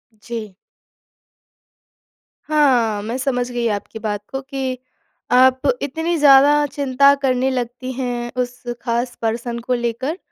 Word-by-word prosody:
जी। 215 Hz, -2 st, -7 dB, 1.9 s
हाँ, 255 Hz, -9 st, +2 dB
मैं 230 Hz, +4 st, -3 dB
समझ 250 Hz, -2 st, -1 dB
गई 240 Hz, -1 st, -1 dB
आपकी 210 Hz, +1 st, -4 dB
बात 210 Hz, -2 st, -3 dB
को 270 Hz, -, -3 dB
कि, 265 Hz, -2 st, -4 dB, 0.5 s
आप 260 Hz, +1 st, +5 dB, 0.2 s
इतनी 320 Hz, +5 st, -2 dB
ज़्यादा 290 Hz, +1 st, +6 dB
चिंता 280 Hz, 0 st, +3 dB
करने 260 Hz, -1 st, +1 dB
लगती 250 Hz, 0 st, -4 dB
हैं, 245 Hz, -2 st, -3 dB
उस 245 Hz, 0 st, -5 dB, 0.2 s
ख़ास 240 Hz, +1 st, -2 dB
पर्सन 235 Hz, +1 st, -2 dB
को 250 Hz, +2 st, -2 dB
लेकर 245 Hz, +7 st, -2 dB
250 Hz, 120 wpm, -20 LUFS, 235-270 Hz, 1.9 s, ज़्यादा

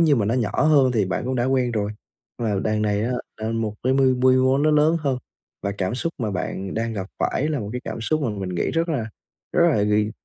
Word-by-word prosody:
như 155 Hz, -5 st, +5 dB
mà 105 Hz, -, +1 dB
nó 115 Hz, -, +1 dB
nhỏ 120 Hz, +1 st, 0 dB
hơn 140 Hz, -5 st, +4 dB
thì 105 Hz, -4 st, +2 dB
bạn 95 Hz, +5 st, -2 dB
cũng 130 Hz, +1 st, -1 dB
đã 120 Hz, -, +1 dB
quen 130 Hz, -2 st, +1 dB
rồi, 105 Hz, -1 st, -1 dB, 0.5 s
nhưng 115 Hz, -2 st, -1 dB
mà 100 Hz, -2 st, 0 dB
đằng 110 Hz, 0 st, +1 dB
này 105 Hz, 0 st, +1 dB
á, 125 Hz, -, -1 dB, 0.2 s
là 110 Hz, +1 st, -3 dB
một 110 Hz, -2 st, -2 dB
cái 130 Hz, +1 st, +2 dB
mô 135 Hz, 0 st, +3 dB, 0.3 s
mô 130 Hz, +1 st, +3 dB
nó 155 Hz, +1 st, +3 dB
lớn 155 Hz, +2 st, +4 dB
hơn 135 Hz, -4 st, 0 dB, 0.4 s
và 100 Hz, -, -1 dB
cảm 95 Hz, +3 st, -1 dB
xúc 165 Hz, +6 st, -2 dB
mà 110 Hz, -4 st, -1 dB
bạn 95 Hz, 0 st, -4 dB
đang 115 Hz, +1 st, -1 dB
gặp 95 Hz, -3 st, -4 dB
phải 150 Hz, +4 st, 0 dB
là 150 Hz, -5 st, -1 dB
một 100 Hz, -, -5 dB
cái 125 Hz, -, -3 dB
cảm -, -, -5 dB
xúc 155 Hz, +7 st, 0 dB
mà 125 Hz, -, 0 dB
mình 100 Hz, -3 st, -4 dB
nghĩ 90 Hz, -1 st, -1 dB
rất 165 Hz, +1 st, 0 dB
là, 120 Hz, -8 st, -1 dB, 0.4 s
rất 170 Hz, 0 st, +4 dB
là 105 Hz, -8 st, +2 dB
vì 105 Hz, +1 st, +2 dB
120 Hz, 265 wpm, -23 LUFS, 105-135 Hz, 0.5 s, như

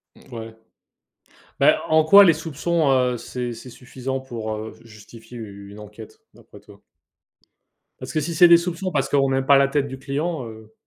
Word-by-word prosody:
Mmh -, -, -18 dB
ouais. 115 Hz, 0 st, -9 dB, 1.0 s
Bah, -, -, +3 dB
en 155 Hz, 0 st, +3 dB
quoi 200 Hz, +6 st, +7 dB
les 170 Hz, -, +5 dB
soupçons, 160 Hz, 0 st, -2 dB
heu, 125 Hz, -2 st, +1 dB
c'est 120 Hz, +1 st, -6 dB
c'est 115 Hz, +2 st, -12 dB
suffisant 130 Hz, +2 st, -6 dB
pour, 115 Hz, -4 st, -6 dB
heu, 110 Hz, +1 st, -8 dB
ju 115 Hz, -, -18 dB
justifier 115 Hz, +3 st, -14 dB
une 100 Hz, -1 st, -11 dB
enquête 105 Hz, -, -13 dB
d'après -, -, -17 dB
toi? -, -, -19 dB, 1.2 s
Parce -, -, -8 dB
que 155 Hz, -, 0 dB
si 170 Hz, +3 st, -4 dB
c'est 175 Hz, +2 st, +6 dB
des 170 Hz, 0 st, +7 dB
soupçons 180 Hz, +2 st, -4 dB
parce 135 Hz, -4 st, -1 dB
qu'on 135 Hz, -1 st, +2 dB
n'aime 135 Hz, 0 st, -1 dB
pas 140 Hz, 0 st, +5 dB
la 140 Hz, 0 st, +3 dB
tête 140 Hz, 0 st, -1 dB
du 135 Hz, -1 st, -9 dB
client, 140 Hz, +1 st, -4 dB
heu 110 Hz, 0 st, -13 dB
135 Hz, 190 wpm, -22 LUFS, 115-155 Hz, 1.2 s, quoi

